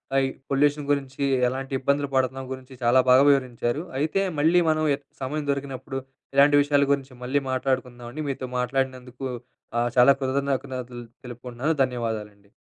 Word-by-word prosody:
ఆహ్, 135 - +5
ఈ - - 0 0.2
పొల్యూషన్ 145 +1 +2
గురించి, 140 -1 -1 0.3
ఎలాంటి 135 +1 -5
ఇబ్బందులు 140 +1 0
పడుతున్నాం 130 0 0
గురించి, 130 0 -11
చాలా 120 +2 +5
బాగా 130 +2 +7
వివరించారు. 130 +1 +1 0.2
అయితే 160 +6 +1 0.2
మళ్ళీ 165 +4 +4
మనం 155 0 +1
ఎ - - -12 0.2
సమయం 145 +3 -3
దొరికినప్పుడు 135 -1 -4 0.4
ఇలాంటి 145 +1 +6
విషయాల 145 0 +3
గురించి 135 -2 -1
మళ్ళీ 135 +3 +1
మాట్లాడుకుందామండి. 130 +1 -2
మీతో 130 -1 -4
మాట్లాడినందుకు 130 0 -2 0.5
ఆహ్, 120 0 +1
చాలా 125 +3 +8
కృతజ్ఞతలు 130 -2 -2 0.2
తెలుపుకుంటున్నాను. 125 +5 -3
ధన్యవాదాలండి. 110 -5 -4
135 Hz, 140 wpm, -25 LUFS, 125-140 Hz, 0.5 s, చాలా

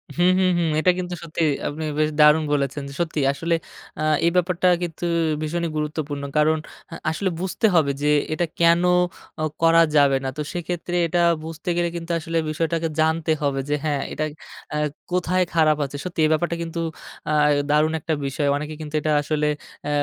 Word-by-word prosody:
হুম, 175 +1 +4
হুম, 185 -1 +3
হুম, 165 -2 +1
এটা 180 +3 +4
কিন্তু 180 0 -4
সত্যি। 165 0 -4 0.3
আপনি 155 +2 -4 0.2
বেশ 155 0 +3
দারুণ 150 +1 +6
বলেছেন। 140 0 -1 0.2
সত্যি 165 -3 -1
আসলে 165 +4 -1 0.4
আ - - -2 0.2
এই 170 - +4
ব্যাপারটা 180 0 +2 0.2
কিন্তু 175 0 -4 0.4
ভীষণই 170 +2 -2
গুরুত্বপূর্ণ। 150 -2 -3
কারণ 155 +1 +4 0.4
আ - - -5
আসলে 185 +4 -1
বুঝতে 190 +4 -1
হবে 150 -4 +4
যে, 150 - +1 0.3
এটা 175 +2 0 0.2
কেন 170 +1 +5 0.8
করা 165 0 +6
যাবে 140 -2 +5
না। 135 - -1
তো - - -2
সেক্ষেত্রে 175 0 -4
এটা 175 +2 0 0.2
বুঝতে 165 +3 -6
গেলে 175 0 +1
কিন্তু 170 0 -5
আসলে 165 +1 -3
বিষয়টাকে 165 +1 -1
জানতে 160 0 +2
হবে 140 -2 0
যে, 150 - +2
হ্যাঁ, 145 -2 0
এটা 155 - -2 0.5
আ - - 0 0.3
কোথায় 180 +1 +1
খারাপ 155 -2 +4
আছে। 140 +1 -7
সত্যি 180 -2 -6
এই 155 - +2
ব্যাপারটা 170 +2 0
কিন্তু 165 0 -5 0.5
আ - - +1 0.4
দারুণ 155 +2 +3
একটা 160 +2 -2
বিষয়। 140 +2 -1
অনেকে 150 +2 -4
কিন্তু 150 0 -8
এটা 155 - 0
আসলে 150 0 0 0.4
আ - - -1
160 Hz, 175 wpm, -23 LUFS, 150-170 Hz, 0.8 s, দারুণ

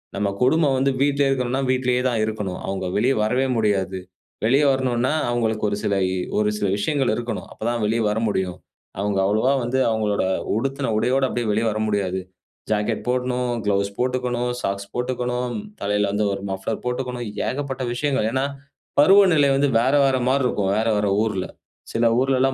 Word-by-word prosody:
நம்ம 100 +1 0
கொடும 145 +3 +3
வந்து 135 +1 +2
வீட்ல 140 0 +2
இருக்கணுன்னா, 130 0 0
வீட்லயே 125 -1 +1
தான் 120 -3 -1
இருக்கணும். 105 -4 -4
அவுங்க 95 -1 -3
வெளிய 125 +6 +3
வரவே 125 +5 +1
முடியாது. 100 -3 0 0.5
வெளிய 135 +6 +4
வரணுன்னா, 130 0 0 0.2
அவுங்களுக்கு 110 -3 0
ஒரு 100 - -2
சில 100 - +1 0.2
இ - - -1 0.2
ஒரு 105 0 +2
சில 105 - 0
விஷயங்கள் 135 +5 +1
இருக்கணும், 120 -3 -4
அப்பதான் 120 +1 -2
வெளிய 115 +2 +1
வர 105 +1 0
முடியும். 95 -3 -1 0.4
அவுங்க 100 -1 0
அவ்ளவா 110 +7 +2
வந்து 125 +2 0
அவுங்களோட 110 -2 0 0.3
உடுத்துன 135 +2 -1
உடையோட 125 +5 +1
அப்டியே 120 -2 -2
வெளிய 110 +2 +1
வர 105 - -3
முடியாது. 95 -3 -1 0.5
ஜாக்கெட் 105 +1 -1
போடணும், 125 0 0 0.2
க்ளவுஸ் 100 0 0
போட்டுக்கணும், 125 -1 -1
சாக்ஸ் 100 0 -3
போட்டுக்கணும், 125 0 -2 0.3
தலைல 105 0 +1
வந்து 105 +1 0
ஒரு 100 - -5
மஃப்ளர் 95 +3 -4
போட்டுக்காணும், 125 -1 -3 0.2
ஏகப்பட்ட 135 -1 -3
விஷயங்கள். 135 -3 0
ஏன்னா, 130 +2 0 0.5
பருவநிலை 175 -2 +6
வந்து 140 +1 +3
வேற 130 +4 +2
வேற 135 -1 +3
மார்ருக்கும். 125 -7 +1
வேற 110 +1 +1
வேற 105 0 +1 0.2
ஊர்ல. 100 -5 -2 0.5
சில 115 +1 +2
ஊர்லலாம் 135 0 +2
120 Hz, 160 wpm, -22 LUFS, 105-130 Hz, 0.5 s, பருவநிலை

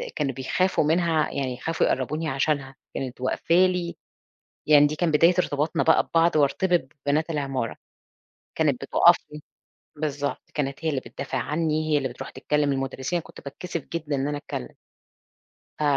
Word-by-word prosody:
كانوا 135 -2 -1
بيخافوا 170 +10 +1
منها، 160 0 +2
يعني 135 -2 -2
يخافوا 160 +6 -1
يقربوني 155 +5 -1
عشانها، 135 -1 -1 0.2
كانت 125 -2 -5
واقفة 130 +5 0
لي. 180 -1 +2 0.7
يعني 145 -1 +7
دي 155 - -3
كان 170 +1 +1
بداية 165 +4 +5
ارتباطنا 150 -2 0
بقى 160 - +5
ببعض 165 0 +2
وارتبط 155 +1 +2 0.2
ببنات 150 +3 +1
العمارة، 135 -6 -2 0.8
كانت - - +1
بتُقف - - +6 0.2
لي 150 - -8 0.6
بالضبط، 145 -2 -2
كانت 140 +1 -3
هي - - +3
اللي 140 -4 -1
بتدافع 135 0 -5
عني، 155 +3 -1
هي - - +5
اللي 135 -2 -1
بترُوح - - -8
تتكلم 145 +2 0
المدرسين، 135 +4 -2
أنا 170 - -4
كنت - - -13
باتكسف 165 +2 -6
جدًا 155 -3 -2
إن 135 +1 -1
أنا 145 0 -2
أتكلم. - - -7 1.0
ف - - -1
150 Hz, 160 wpm, -25 LUFS, 135-165 Hz, 1.0 s, يعني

